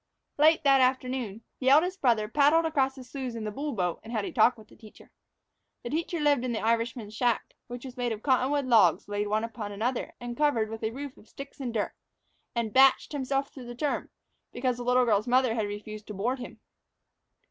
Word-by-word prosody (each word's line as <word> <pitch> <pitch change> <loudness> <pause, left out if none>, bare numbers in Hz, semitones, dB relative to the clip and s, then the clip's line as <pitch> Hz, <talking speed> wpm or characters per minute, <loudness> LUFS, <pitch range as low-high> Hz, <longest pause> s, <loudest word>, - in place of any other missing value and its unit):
LATE 315 +2 +5
that 275 -2 +5
afternoon, 255 -4 -1 0.2
the 260 - +2
eldest 355 +7 +4
brother 230 -5 +2
paddled 295 +7 +4
across 270 -4 +1
the 260 - -10
sloughs 255 -1 -6
in 225 - -5
the 210 - -3
bull 290 +7 -4
boat, 180 -5 -1
and 225 - -10
had 215 -4 -1
a - - -5
talk 240 +1 +4
with 215 -1 -15
the - - -18
teacher. 215 -2 -16 0.7
The 240 - -5
teacher 335 +2 -2
lived 290 -4 +2
in 250 -2 -2
the 220 - -1
Irishman's 230 -1 -1
shack, 240 0 0
which 245 +1 -8
was 255 -1 -8
made 245 -1 -1
of 220 -1 -5
cottonwood 270 +1 +2
logs 210 -11 +4
laid 205 0 -2
one 215 +1 0
upon 220 -2 -5
another 235 +5 -3
and 240 0 -6
covered 235 -7 +1
with 225 0 -7
a 220 - +1
roof 275 +3 -7
of 215 - -19
sticks 275 +1 -10
and 255 -3 -3
dirt, 220 -3 -2 0.6
and 230 -2 -2
"bached" 265 0 +5
by 295 - -3
himself 275 +1 -2
through 255 -3 -10
the 240 - -7
term, 285 +3 -2 0.4
because 250 -1 -1
the 245 - -5
little 250 +1 +3
girl's 210 -1 +2
mother 250 -1 +3
had 220 -3 -1
refused 210 +1 -8
to 210 - -7
board 245 +7 -1
him. 245 - -9
245 Hz, 220 wpm, -28 LUFS, 220-270 Hz, 0.7 s, LATE